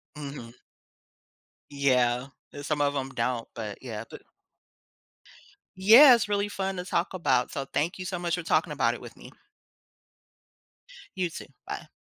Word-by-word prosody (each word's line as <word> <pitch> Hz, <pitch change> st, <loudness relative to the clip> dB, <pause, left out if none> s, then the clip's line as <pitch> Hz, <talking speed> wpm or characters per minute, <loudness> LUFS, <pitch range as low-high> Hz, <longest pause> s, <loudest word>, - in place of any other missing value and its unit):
Mhm. 140 Hz, -5 st, -8 dB, 1.2 s
Yeah. 125 Hz, -3 st, +1 dB, 0.2 s
And 145 Hz, 0 st, -8 dB
some 150 Hz, -1 st, -1 dB
of 145 Hz, 0 st, +1 dB
'em 135 Hz, -1 st, -2 dB
don't, 120 Hz, -1 st, -2 dB
but 105 Hz, -3 st, -6 dB
yeah. 115 Hz, -4 st, -6 dB
Bu -, -, -10 dB, 1.6 s
Yeah, 230 Hz, +9 st, +9 dB
it's 225 Hz, -3 st, -2 dB
really 205 Hz, 0 st, 0 dB
fun 195 Hz, -1 st, -3 dB
to 180 Hz, -, -5 dB
talk 180 Hz, 0 st, -1 dB
about. 130 Hz, -9 st, +1 dB
So 140 Hz, -3 st, -4 dB
thank 170 Hz, +8 st, -2 dB
you 185 Hz, -, -5 dB
so 180 Hz, -1 st, -4 dB
much 175 Hz, 0 st, -1 dB
for 175 Hz, -, -5 dB
talking -, -, +1 dB
about -, -, +1 dB
it -, -, -9 dB
with -, -, -11 dB
me. -, -, -13 dB, 1.9 s
You 180 Hz, -2 st, -1 dB
too. 165 Hz, -, -9 dB, 0.2 s
Bye. -, -, -6 dB
145 Hz, 155 wpm, -27 LUFS, 125-185 Hz, 1.9 s, Yeah